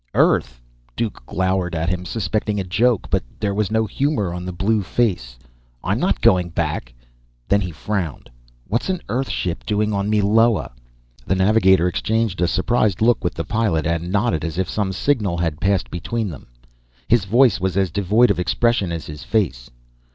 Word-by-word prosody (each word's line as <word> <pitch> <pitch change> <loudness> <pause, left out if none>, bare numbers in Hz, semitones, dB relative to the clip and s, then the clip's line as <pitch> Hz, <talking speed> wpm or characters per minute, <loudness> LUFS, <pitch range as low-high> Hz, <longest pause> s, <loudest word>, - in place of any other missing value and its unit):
"Earth?" 60 -1 +2 0.4
Duke 115 - -3
glowered 95 -1 -1
at 80 +1 -1
him, 90 0 -3
suspecting 105 +2 -2
a - - -1
joke, 110 +5 +1
but - - +2 0.2
there 100 -1 -1
was 105 -1 0
no 110 0 +1
humor 110 - -1
on 90 0 -5
the 90 - -4
blue 105 +5 0
face. 90 - -1 0.5
"I'm - - 0
not - - 0
going 90 -1 +4
back!" - - -3 0.6
Then 100 0 +3
he 95 - -3
frowned. 85 0 -4 0.4
"What's 115 - -2
an 185 -2 -2
Earth 130 +5 -1
ship 85 -2 -3
doing 105 0 0
on 100 +1 -1
Meloa?" 110 +2 +3 0.6
The 95 - +2
navigator 95 -2 +4
exchanged 110 +1 -1
a 90 - +3
surprised 105 +2 +1
look 115 0 +3
with 90 - -1
the 85 - -3
pilot, 105 -9 0
and 85 +2 -1
nodded 105 -4 +1
as 85 -1 -4
if 95 - 0
some 100 -3 -1
signal 100 -4 0
had 80 -3 -2
passed 95 -2 +1
between 105 +5 -3
them. 75 -7 -10 0.6
His 115 -4 +3
voice 115 +1 +4
was 95 0 -1
as 95 -3 +1
devoid 105 +5 +3
of 100 - -1
expression 100 0 +1
as 85 -2 -4
his 75 0 -8
face. 80 - -1
95 Hz, 180 wpm, -21 LUFS, 85-110 Hz, 0.6 s, going